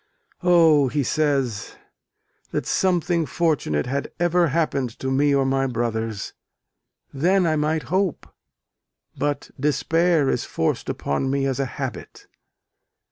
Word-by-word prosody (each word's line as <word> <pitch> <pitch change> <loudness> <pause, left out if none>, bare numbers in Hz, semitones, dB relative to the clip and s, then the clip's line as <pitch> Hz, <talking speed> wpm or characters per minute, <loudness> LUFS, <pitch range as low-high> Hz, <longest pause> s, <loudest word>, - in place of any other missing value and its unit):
"O," 165 -6 +5
he 145 +2 -1
says, 135 -6 -1 0.7
"that - - -3
something 175 -3 +1
fortunate 150 - 0
had 140 +2 -3
ever 175 0 +3
happened 145 -4 0
to 130 - -3
me 145 +2 +3
or 135 -1 +2
my 135 0 +1
brothers! 115 -3 -3 0.8
Then 180 +7 +2
I 160 -1 +2
might 155 +1 0
hope 190 -4 0 0.9
but 145 0 -2
despair 160 +2 +2
is 125 -2 0
forced 80 - -2
upon 100 - -2
me 135 0 0
as 135 -1 -1
a 135 - 0
habit." - - -6
145 Hz, 125 wpm, -23 LUFS, 130-165 Hz, 0.9 s, O